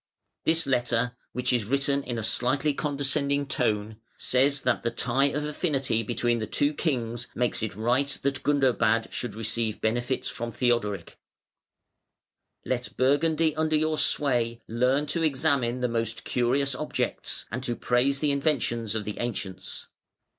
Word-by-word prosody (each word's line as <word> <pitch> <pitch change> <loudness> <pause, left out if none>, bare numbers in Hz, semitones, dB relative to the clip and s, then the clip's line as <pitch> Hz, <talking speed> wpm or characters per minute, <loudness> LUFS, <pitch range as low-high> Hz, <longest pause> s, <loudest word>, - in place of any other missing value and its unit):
This 165 +1 +3
letter, 120 -2 +1 0.2
which 125 0 -1
is 120 -3 +2
written 140 +3 +1
in 120 -3 -4
a 110 - -3
slightly 135 +6 +1
condescending 140 0 +1
tone, 110 -5 -1 0.2
says 135 +2 +1
that 125 -1 +1
the 115 - 0
tie 125 +3 +1
of 150 +1 -1
affinity 140 -6 0
between 120 +1 0
the 110 - -3
two 145 +7 +1
kings 120 -6 -2
makes 120 -1 0
it 110 -2 -3
right 125 +6 +1
that 135 -1 0
Gundobad 130 -6 +2
should 120 -5 -4
receive 110 0 -2
benefits 120 +4 -1
from 120 0 -4
Theodoric: 105 -6 -1 1.5
"Let 125 -1 -3
Burgundy 155 +4 +2
under 155 0 +1
your 155 0 +1
sway 120 -5 +1
learn 125 +5 +2
to 165 +3 -2
examine 135 -5 +1
the 125 - +2
most 115 -1 -2
curious 130 +3 +1
objects, 150 +4 -2
and 120 +3 -3
to 120 -2 -1
praise 130 +4 +1
the 150 -2 +2
inventions 125 -6 0
of 105 -2 -2
the 105 - -5
ancients. 105 -5 -4
125 Hz, 145 wpm, -27 LUFS, 115-140 Hz, 1.5 s, This